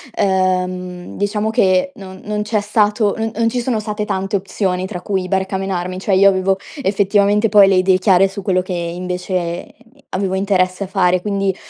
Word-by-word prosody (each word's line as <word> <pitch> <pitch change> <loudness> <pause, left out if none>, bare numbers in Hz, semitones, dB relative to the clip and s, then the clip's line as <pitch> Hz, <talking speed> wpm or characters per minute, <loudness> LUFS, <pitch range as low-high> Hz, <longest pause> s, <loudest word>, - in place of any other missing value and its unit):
ehm, 185 -1 -1
diciamo 210 +2 -1
che 190 +4 +2
non 190 -1 -10
non 210 0 -2
c'è 210 0 0
stato 210 0 +1
non 225 0 -2
non 230 0 +1
ci 245 +1 -2
sono 235 -3 -1
state 210 0 -4
tante 195 0 -1
opzioni 185 -1 -2
tra 180 -3 -6
cui 190 -1 -2
barcamenarmi; 190 -1 -2
cioè, 195 0 0
io 195 +1 +6
avevo 190 0 +1 0.2
effettivamente 205 +1 +2
poi 205 -1 +6
le 195 - +3
idee 185 0 +3
chiare 190 0 +4
su 195 +1 -7
quello 185 -1 0
che 185 0 -5
invece 180 0 -4 0.3
avevo 190 0 -2
interesse 190 -1 0
a - - -10
fare. 185 -2 +1
Quindi, 195 -2 -1
190 Hz, 175 wpm, -18 LUFS, 185-205 Hz, 0.3 s, io